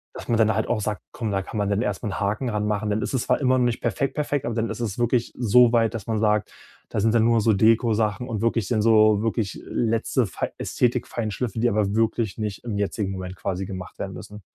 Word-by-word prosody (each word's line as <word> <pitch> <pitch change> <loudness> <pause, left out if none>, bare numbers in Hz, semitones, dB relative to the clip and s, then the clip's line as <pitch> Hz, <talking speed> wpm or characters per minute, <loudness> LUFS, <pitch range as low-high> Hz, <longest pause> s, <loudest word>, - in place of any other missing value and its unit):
dass - - -8
man 115 - +2
dann 110 -1 +4
halt 110 - 0
auch 110 - 0
sagt: 105 -1 -3
„Komm, 110 -3 -3
da 95 -1 0
kann 105 - -7
man 100 -1 0
dann 100 +1 +1
erstmal 105 -1 -2
'n - - -4
Haken 105 +6 -1
dran 105 -2 -1
machen.“ 105 0 -1
Dann 105 +1 0
ist - - -3
es 130 -1 0
zwar - - +1
immer 130 -2 +3
noch 125 - +3
nicht 120 -1 -1
perfekt, 125 +4 -1
perfekt, 145 -2 -1
aber 120 - -2
dann 115 0 -1
ist - - -5
es 110 -5 -3
wirklich 120 0 0
so 120 0 +5
weit, 115 -1 +2
dass 115 -3 -6
man 110 -1 0
sagt: 105 -1 +1 0.4
„Da - - -2
sind 110 +2 +2
dann 115 -1 +4
nur 115 0 +4
noch - - +4
so 110 +1 +3
Dekosachen 110 +2 +2
und 110 -5 -3
wirklich 115 -3 +1
dann 110 0 +1
so 110 -1 +5
wirklich 110 -2 -2
letzte 115 +2 0
fei 95 - -4
Ästhetik-Feinschliffe, 115 -2 -1
die 120 - +3
aber 105 -2 0
wirklich 115 -1 0
nicht 105 -3 -4
im 115 -4 -3
jetzigen 100 -1 -1
Moment 95 -1 -6
quasi 95 0 -3
gemacht 95 -1 -8
werden - - -4
müssen.“ 105 0 -10
110 Hz, 250 wpm, -24 LUFS, 105-115 Hz, 0.4 s, so